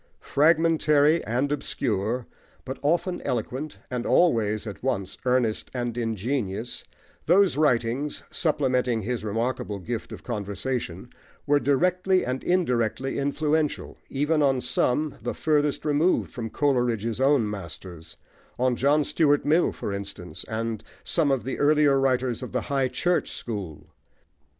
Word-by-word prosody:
Fragmentary 155 0 +3
and 125 +6 0
obscure, 115 -4 -1 0.4
but 130 +1 -5
often 175 +4 0
eloquent, 130 +6 -3
and 125 -1 -2
always 110 -12 +2
at 105 -3 -7
once 100 -7 -2
earnest 125 -3 +1
and 120 -2 -2
ingenious, 115 -1 -2 0.4
those 185 +3 +5
writings, 135 -1 +1
supplementing 125 - +1
his 120 +1 -3
remarkable 110 0 -2
gift 110 +4 -5
of - - -9
conversation, 105 -1 -4 0.3
were 145 0 +4
directly 180 +6 +2
and 130 +1 -3
indirectly 130 -8 0
influential, 150 +2 0
even 150 +3 +1
on 135 -2 +3
some 145 +4 0
the - - -3
furthest 150 -2 +1
removed 150 +4 +2
from 115 -4 -5
Coleridge's 120 -4 0
own 135 -4 +4
masters; 85 -4 -8 0.4
on 125 0 +2
John 145 +4 +3
Stuart 145 -2 +2
Mill, 160 +4 +3
for 100 - -5
instance, 100 -4 -7
and 110 -1 -3 0.2
some 160 -4 +1
of 135 -5 +1
the 130 - -4
earlier 145 -2 +4
writers 130 -2 +1
of 125 - -6
the 125 - 0
"high 135 0 0
church" 175 +8 0
school. 100 -10 -6
130 Hz, 130 wpm, -26 LUFS, 115-150 Hz, 0.4 s, those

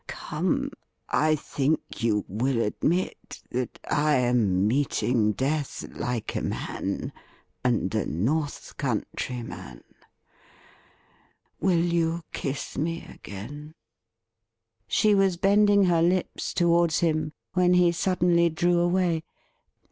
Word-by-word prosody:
Come, - - -2 0.4
I 155 0 +3
think 150 0 -2
you 105 -3 +1
will 120 +5 0
admit 160 - -2
that 125 0 -3
I 150 0 +2
am 120 -7 +2
meeting 120 -3 +1
death 140 +4 -2
like 120 -3 -3
a - - -1
man, - - -3 0.5
and 120 -6 +1
a 110 - 0
North 140 - -2
Country 125 -2 -3
man. 65 - -9 1.8
Will 175 -3 +2
you 170 -1 0
kiss 135 0 -4
me 165 +2 -2
again 145 +10 -9 0.6
?' 115 0 -58
She 215 -1 +3
was 195 -3 +3
bending 200 +2 +4
her 175 -3 +3
lips 180 +2 0
towards 170 -1 +3
him, 155 -2 0 0.2
when 180 -1 +4
he 180 -1 +5
suddenly 175 -1 +2
drew 175 +2 +2
away. 175 -1 +2
155 Hz, 110 wpm, -26 LUFS, 120-175 Hz, 1.8 s, he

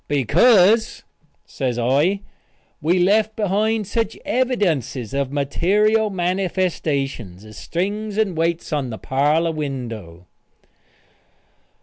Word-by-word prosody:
"Because," 185 - +3 0.4
says 125 -3 -3
I, 145 +11 +1 0.6
"we 170 +4 +2
left 210 +4 +2
behind 215 +1 0
such 225 +2 -2
evidences 170 - -1
of 140 -1 -1
material 210 +10 +1
manifestations 170 - -2
as 110 0 -13
strings 205 +4 -3
and 210 -5 +1
weights 165 0 -1
on 140 -4 -1
the 110 - -6
parlor 150 - +1
window." 115 - -6
170 Hz, 95 wpm, -21 LUFS, 135-205 Hz, 0.6 s, Because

